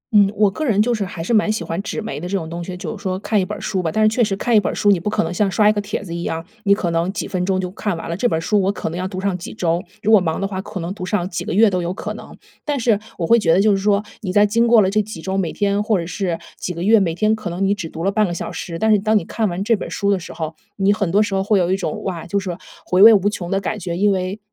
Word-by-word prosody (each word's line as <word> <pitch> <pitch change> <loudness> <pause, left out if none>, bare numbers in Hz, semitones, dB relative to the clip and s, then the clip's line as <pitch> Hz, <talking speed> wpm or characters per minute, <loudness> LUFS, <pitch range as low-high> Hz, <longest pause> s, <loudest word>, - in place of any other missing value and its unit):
嗯， 200 -1 +6
我 210 -2 +4
个 310 - -4
人 225 -9 +1
就 235 +3 +3
是 210 -3 -1
还 170 -2 -6
是 230 - -1
蛮 215 0 +3
喜 215 -5 -2
欢 170 +3 -3
纸 - - -4
媒 225 -7 -5
的 175 - -5
这 195 +1 -1
种 160 - -5
东 170 +1 -5
西， 180 +1 -6
就 - - -5
是 - - -12
说 185 -1 -2
看 205 +1 0
一 - - 0
本 210 +3 -5
书 190 -2 -2
吧， 165 - -2
但 215 +4 +1
是 - - +6
确 245 - +3
实 205 -3 0
看 230 +4 0
一 - - +8
本 - - -2
书， 205 - +3
你 190 - +3
不 210 - -2
可 - - +1
能 165 +2 -3
像 200 +2 +1
刷 210 +2 +3
一 210 - +5
个 205 - -1
帖 205 0 -4
子 170 - -7
一 170 - -4
样， 165 -1 -3 0.2
你 200 - +5
可 180 -4 -2
能 165 +2 0
几 210 - -3
分 180 -1 -2
钟 190 -1 +1
就 180 -1 -3
看 205 -2 -3
完 - - -7
了。 170 - -3
这 245 +6 +1
本 160 - 0
书 205 +5 +1
我 195 +1 +1
可 - - -4
能 170 - -5
要 185 - -2
读 185 -1 -6
上 195 -1 -1
几 175 - -8
周， 170 -2 0 0.2
如 215 - +2
果 215 -4 +7
忙 160 -2 -1
的 195 - -1
话， 190 -1 -4
可 190 - -7
能 175 +3 -4
读 185 - -8
上 185 -2 -1
几 - - -3
个 - - -5
月 225 +2 +6
都 185 -3 0
有 170 - -2
可 - - -5
能。 - - -11 0.3
但 290 -2 -1
是 225 -4 +2 0.2
我 170 - -1
会 235 +6 +5
觉 165 -6 +2
得 180 - +4
就 210 +1 +4
是 195 - +3
说， 200 +1 +2 0.2
你 185 -3 -3
在 205 +2 +5
经 230 +3 +2
过 230 -3 +6
了 185 - +2
这 215 +1 +2
几 210 -4 -8
周， 190 +4 -3
每 185 -4 0
天 205 0 0
或 215 -1 +1
者 170 - -3
是 175 -1 -2 0.2
几 180 - -3
个 170 - -4
月， 220 +2 +5
每 165 -4 0
天 215 +3 +2
可 215 -5 -6
能 185 +3 -1
你 200 - +3
只 185 -6 -5
读 165 - -6
了 195 - +2
半 210 0 +2
个 175 - -4
小 - - -5
时， 165 -2 -5
但 220 +3 +2
是 210 - +5
当 215 +2 +2
你 195 - -2
看 220 +1 -1
完 175 +3 -3
这 230 +2 +3
本 210 - -6
书 200 -1 0
的 195 - +1
时 170 - -9
候， 160 -1 -5 0.2
你 200 +1 +3
很 200 -5 -1
多 205 +3 +4
时 205 -2 -4
候 190 0 +1
会 205 +1 +2
有 180 -1 +1
一 - - +3
种， 215 +2 -4
哇， 175 -3 -4
就 200 - 0
是 185 -3 -4 0.3
回 180 +1 +2
味 220 +2 +11
无 200 +1 +2
穷 175 -4 -5
的 195 - +1
感 210 +2 -3
觉。 175 -2 -4
因 205 +2 +3
为 190 +2 -2
195 Hz, 375 characters per minute, -20 LUFS, 180-210 Hz, 0.3 s, 味